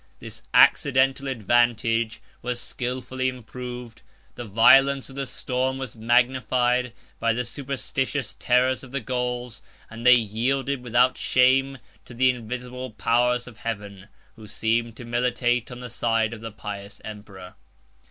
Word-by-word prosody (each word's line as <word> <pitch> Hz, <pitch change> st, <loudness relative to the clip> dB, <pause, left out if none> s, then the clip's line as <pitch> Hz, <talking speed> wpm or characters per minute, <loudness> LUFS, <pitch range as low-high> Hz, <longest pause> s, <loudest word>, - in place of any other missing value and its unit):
This -, -, -10 dB
accidental 135 Hz, 0 st, +4 dB
advantage 115 Hz, -1 st, +1 dB, 0.2 s
was 120 Hz, 0 st, -3 dB
skilfully 130 Hz, +1 st, -3 dB
improved, 125 Hz, -1 st, -8 dB, 0.3 s
the 120 Hz, -, -7 dB
violence 135 Hz, +6 st, +5 dB
of -, -, -12 dB
the 135 Hz, -1 st, -3 dB
storm 130 Hz, +1 st, -2 dB
was 130 Hz, -4 st, -6 dB
magnified 125 Hz, +1 st, +2 dB, 0.3 s
by 115 Hz, 0 st, +2 dB
the 125 Hz, +2 st, -2 dB
superstitious 135 Hz, +2 st, -3 dB
terrors 130 Hz, +2 st, +2 dB
of 130 Hz, -, -12 dB
the 140 Hz, -, -2 dB
Gauls; 125 Hz, -1 st, -3 dB, 0.3 s
and 115 Hz, +1 st, -8 dB
they 125 Hz, +1 st, +8 dB
yielded 125 Hz, +5 st, -1 dB
without 125 Hz, +1 st, +2 dB
shame 135 Hz, +2 st, +3 dB, 0.3 s
to 125 Hz, -, -12 dB
the 130 Hz, +1 st, +4 dB
invisible 125 Hz, +2 st, -6 dB
powers 120 Hz, +2 st, +1 dB
of 120 Hz, -3 st, -13 dB
heaven, 100 Hz, -4 st, -6 dB, 0.3 s
who 110 Hz, -1 st, -12 dB
seemed 115 Hz, +2 st, -1 dB
to 120 Hz, -, -9 dB
militate 120 Hz, 0 st, 0 dB
on 125 Hz, 0 st, -9 dB
the 125 Hz, -, -6 dB
side 115 Hz, -1 st, 0 dB
of 110 Hz, -, -9 dB
the 115 Hz, 0 st, -6 dB
pious 100 Hz, -1 st, -8 dB
emperor. 105 Hz, -3 st, -10 dB
125 Hz, 140 wpm, -24 LUFS, 115-130 Hz, 0.3 s, they